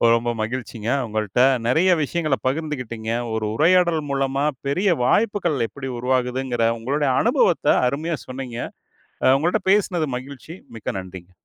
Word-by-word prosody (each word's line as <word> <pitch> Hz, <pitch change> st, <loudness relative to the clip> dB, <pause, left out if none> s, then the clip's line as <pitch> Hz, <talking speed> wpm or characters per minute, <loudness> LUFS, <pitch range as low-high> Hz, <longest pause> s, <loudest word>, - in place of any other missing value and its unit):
ரொம்ப 120 Hz, +1 st, -1 dB
மகிழ்ச்சிங்க. 115 Hz, -1 st, -4 dB, 0.2 s
உங்கள்ட்ட 110 Hz, +1 st, -1 dB, 0.3 s
நிறைய 165 Hz, +9 st, +3 dB
விஷயங்களை 155 Hz, -2 st, -1 dB
பகிர்ந்துக்கிட்டீங்க. 125 Hz, -6 st, -3 dB, 0.2 s
ஒரு 110 Hz, -1 st, -1 dB
உரையாடல் 170 Hz, +2 st, +3 dB
மூலமா 135 Hz, +1 st, 0 dB, 0.2 s
பெரிய 180 Hz, +6 st, +2 dB
வாய்ப்புகள் 205 Hz, -, +1 dB
எப்படி 135 Hz, +1 st, -7 dB
உருவாகுதுங்கிற 125 Hz, -1 st, 0 dB
உங்களுடைய 140 Hz, +4 st, 0 dB
அனுபவத்தை -, -, +3 dB
அருமையா 155 Hz, +5 st, -2 dB
சொன்னீங்க. 130 Hz, -2 st, -6 dB, 0.7 s
அ 130 Hz, -, +6 dB
உங்கள்ட்ட 175 Hz, +8 st, 0 dB
பேசினது 180 Hz, -6 st, +1 dB
மகிழ்ச்சி. 140 Hz, +5 st, -10 dB, 0.2 s
மிக்க 105 Hz, -, -4 dB
நன்றிங்க. 95 Hz, -1 st, -10 dB
135 Hz, 120 wpm, -22 LUFS, 120-160 Hz, 0.7 s, அ